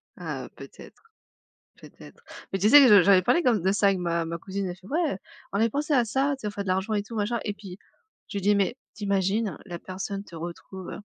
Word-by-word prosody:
Ah, - - -5
heu, - - -12
peut-être, - - -13 0.8
peut-être. - - -15 0.3
Mais 195 - 0
tu 210 - +3
sais 290 +5 +10
que 265 - +7
je 205 -5 +8
j'avais 195 -2 +6
parlé 335 - +2
quand 250 -5 +4
m 205 - -2
de 190 +3 +2
ça 205 0 +2
avec 195 -1 +2
ma 170 -1 -1
ma 165 +1 -4
cousine. 190 +2 -4
Elle 175 - -5
fait: 185 - -16
«Ouais, 310 - 0 0.4
on - - 0
avait 230 - +3
pensé 295 +5 -1
à 250 -4 +4
ça, 270 +6 0
tu - - -18
sais 210 - -3
on - - -3
fait 205 -1 -5
de 195 - -10
l'argent 190 +4 0
et 205 -1 0
tout, 230 - -10
machin» 220 +2 -1
et 205 - -3
puis, 195 -3 -11 0.5
je 205 - -5
lui - - -3
dis: 205 +2 +3
«Mais 200 +5 0 0.2
tu 210 - -8
imagines 200 +2 0
la 175 -3 -7
personne 195 +2 -5
te 175 - -13
retrouve 175 +3 -8
200 Hz, 260 wpm, -26 LUFS, 185-220 Hz, 0.8 s, sais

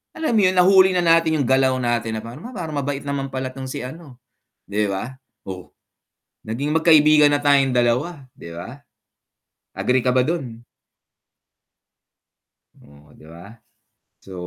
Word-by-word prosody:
alam 320 -3 -2
mo 225 - +2
yun 185 - 0
nahuli 190 +1 +5
na 180 - +1
natin 165 -1 +3
yung - - -3
galaw 130 0 +2
natin 120 -3 -2
na 110 - -6
parang 155 - -10
parang 165 -4 -5
mabait 140 0 -4
naman 140 -1 -3
pala 130 -1 -5
tong 130 0 -8
si 130 - -6
ano, 140 +1 -10 0.5
'di 105 +1 -2
ba? 100 +7 -5 0.2
Oh, 95 -1 -8 0.8
naging 140 +8 -3
magkaibigan 155 -2 +5
na 145 - +2
tayong 140 -2 +3
dalawa 125 +5 -1
'di 85 - -12
ba? 115 +12 -10 0.9
Agree 125 -1 0
ka 125 - +2
ba 130 - +3
dun? 125 -5 -3 2.1
Oh, 75 +1 -21
'di 75 - -18
ba, 85 +6 -13 0.7
so 95 - -13
135 Hz, 150 wpm, -21 LUFS, 115-155 Hz, 2.1 s, nahuli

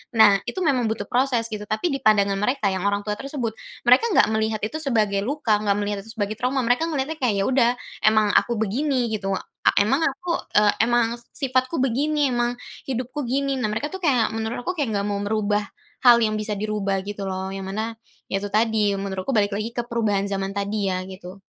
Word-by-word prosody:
Nah 205 -3 +7
itu - - -3
memang 260 -7 +2
butuh 220 -2 -2
proses 250 -1 +2
gitu, 210 -1 -5
tapi 260 +12 -1
di 275 - -2
pandangan 200 -4 +3
mereka 210 -1 +1
yang 190 +1 -1
orang 205 0 0
tua 210 0 -2
tersebut, 270 -4 -3 0.3
mereka 250 - +5
nggak - - +6
melihat 220 0 0
itu 260 +9 -2
sebagai 220 -9 +1
luka, 225 -1 0
nggak 205 -1 +1
melihat 205 0 -2
itu - - -8
sebagai 210 0 -3
trauma, 255 +1 0
mereka 245 +7 +2
ngelihatnya 305 0 -2
kayak 245 -6 +1
ya - - -1
udah 250 -3 +4 0.4
emang 215 -1 +4
aku 235 - -3
begini 245 +4 0
gitu, 195 -2 -2 0.3
eee, 200 - +4
emang 270 +8 +2
aku, 355 +2 -2 0.3
eee, 210 -1 +4
emang 240 -1 +3 0.3
sifatku 255 +2 0
begini, 285 +3 +1
emang 240 0 +1 0.4
hidupku 255 +3 -3
gini, 275 +3 0
nah 230 -4 0
mereka 225 +7 -2
itu 380 - -4
kayak 255 -8 +3
menurut 225 +1 -3
aku 360 - -1
kayak 285 -6 0
nggak 200 0 -1
mau 200 - -1
merubah, 210 0 0 0.4
hal 240 -1 +8
yang 215 -1 +1
bisa 215 0 -3
dirubah 205 -2 -1
gitu 205 -1 -5
loh 190 0 -3
yang 195 0 -5
mana, 220 +3 -3 0.3
iya 195 - 0
itu 205 - -3
tadi 220 +1 +2 0.2
menurutku 195 +3 -3
balik 205 0 +2
lagi 215 +2 -2
ke - - +2
perubahan 210 -4 0
zaman 195 0 -2
tadi 200 +1 -2
ya 185 - -1
gitu. 185 +1 -11
220 Hz, 205 wpm, -23 LUFS, 205-255 Hz, 0.4 s, hal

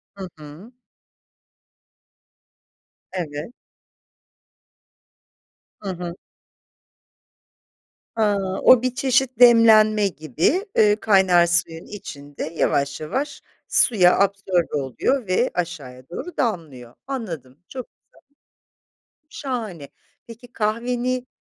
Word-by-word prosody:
Hı 195 -2 -7
hı. 155 +10 -13 2.4
Evet. 155 0 -5 2.3
Hı 200 - -6
hı. 175 -1 -5 2.0
A! 215 -2 +2 0.3
O, 255 -2 +7
bir 255 0 -2
çeşit 260 -2 +1
demlenme 220 -3 +6
gibi, 170 - -1
eee, 210 -1 +5
kaynar 190 -5 +4
suyun 170 -1 0
içinde 145 -8 -9
yavaş 140 -3 -1
yavaş 265 - -4 0.3
suya 185 -7 +4
absorbe 195 -4 0
oluyor 195 - -1
ve 185 +7 +1
aşağıya 140 -7 -6
doğru 355 - -8
damlıyor. 155 - -3
Anladım, 170 - -6
çok 255 -2 -8
güzel. - - -85 1.3
Şahane. 220 - -5 0.4
Peki, 235 +1 -13
kahveni 245 +3 -2
195 Hz, 85 wpm, -22 LUFS, 165-240 Hz, 2.4 s, O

